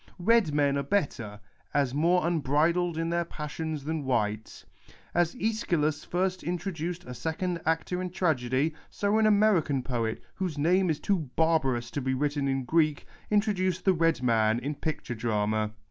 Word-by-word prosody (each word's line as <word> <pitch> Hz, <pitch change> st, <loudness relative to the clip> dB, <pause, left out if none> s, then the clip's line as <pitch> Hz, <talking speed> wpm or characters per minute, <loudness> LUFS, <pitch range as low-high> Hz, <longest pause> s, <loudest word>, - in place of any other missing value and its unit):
Red 205 Hz, -2 st, +3 dB
men 140 Hz, -1 st, +2 dB
are -, -, 0 dB
better, 135 Hz, -, -2 dB, 0.4 s
as 140 Hz, -3 st, +2 dB
more 170 Hz, +4 st, +2 dB
unbridled 165 Hz, +2 st, +1 dB
in 165 Hz, 0 st, -1 dB
their 170 Hz, 0 st, +1 dB
passions 155 Hz, -1 st, -5 dB
than 155 Hz, 0 st, -2 dB
white. 110 Hz, -4 st, -2 dB, 0.5 s
As 175 Hz, +2 st, +1 dB
yEschylus 170 Hz, -, 0 dB
first 185 Hz, +1 st, -1 dB
introduced 175 Hz, -1 st, -4 dB
a 125 Hz, -, -7 dB
second 170 Hz, -, -3 dB
actor 165 Hz, +3 st, 0 dB
in 185 Hz, -, -3 dB
tragedy, 150 Hz, -4 st, 0 dB, 0.2 s
so 205 Hz, +2 st, +1 dB
an 220 Hz, -, +4 dB
American 200 Hz, -11 st, +3 dB
poet, 115 Hz, -3 st, -2 dB
whose 180 Hz, -6 st, -3 dB
name 180 Hz, +5 st, +3 dB
is 155 Hz, -, 0 dB
too 175 Hz, -9 st, -1 dB
barbarous 135 Hz, -8 st, +1 dB
to 145 Hz, -, -3 dB
be 130 Hz, 0 st, 0 dB
wTitten 145 Hz, 0 st, 0 dB
in 135 Hz, -1 st, -1 dB
Greek, 155 Hz, 0 st, +1 dB, 0.2 s
introduced 195 Hz, -4 st, +1 dB
the 190 Hz, -, +5 dB
red 165 Hz, -6 st, +1 dB
man 110 Hz, -2 st, +3 dB
in 140 Hz, +5 st, -3 dB
picture 150 Hz, -4 st, -4 dB
drama. 110 Hz, -2 st, 0 dB
160 Hz, 160 wpm, -28 LUFS, 135-180 Hz, 0.5 s, the